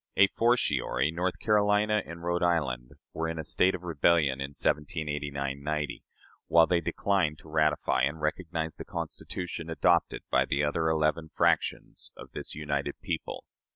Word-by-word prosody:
A 95 - +8
fortiori, 80 - +1
North 90 +2 -1
Carolina 105 0 +3
and 85 0 -8
Rhode 85 +1 0
Island 70 -9 0 0.2
were 80 +1 -2
in 80 - -4
a 80 - -3
state 90 +4 +2
of 90 - -8
rebellion 80 -4 +2
in 70 +1 -5
1789 75 -2 -2
'90, 75 0 -3 0.4
while 85 0 +6
they 85 +1 +1
declined 90 -3 0
to - - -16
ratify 75 -4 +1
and 75 +5 0
recognize 80 +1 -2
the - - -6
Constitution 85 -2 -5
adopted 80 - +2
by - - +4
the 70 +2 0
other 80 +2 +1
eleven 80 0 +1
fractions - - 0
of - - -11
this - - -5
united 75 -2 -3
people. - - -4
80 Hz, 155 wpm, -29 LUFS, 75-85 Hz, 0.4 s, A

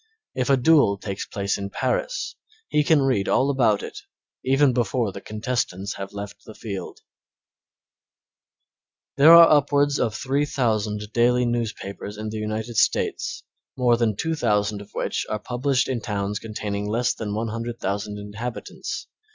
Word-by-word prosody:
If 125 0 -1
a 135 - +5
duel 130 -7 +4
takes 100 0 -5
place 100 -1 -2
in 100 0 -4
Paris - - -2 0.3
he 150 - +2
can 145 -2 +4
read 125 -8 +1
all 140 +2 +3
about 120 -7 +2
it - - -7 0.4
even 135 0 +3
before 115 -2 0
the 100 - -9
contestants 110 -3 -3
have 100 0 -6
left 100 0 -8
the 110 - -12
field. 100 -5 -7 2.2
There 150 +4 +8
are 170 0 +10
upwards 145 -1 +3
of 110 -3 0
3,000 115 -6 0
daily 125 +1 +3
newspapers 110 -3 -4
in 110 0 -4
the 110 - -5
United 110 +2 -4
States, - - 0 0.3
more 125 -2 +4
than 115 -3 +1
2,000 105 -8 0
of 100 - -12
which - - -2
are 110 - -1
published 125 +4 0
in 125 -3 -2
towns 105 -2 -2
containing 105 -2 -4
less 120 +3 +1
than 105 -2 -4
100,000 110 -2 -3
inhabitants. 105 +4 -6
115 Hz, 145 wpm, -24 LUFS, 105-130 Hz, 2.2 s, are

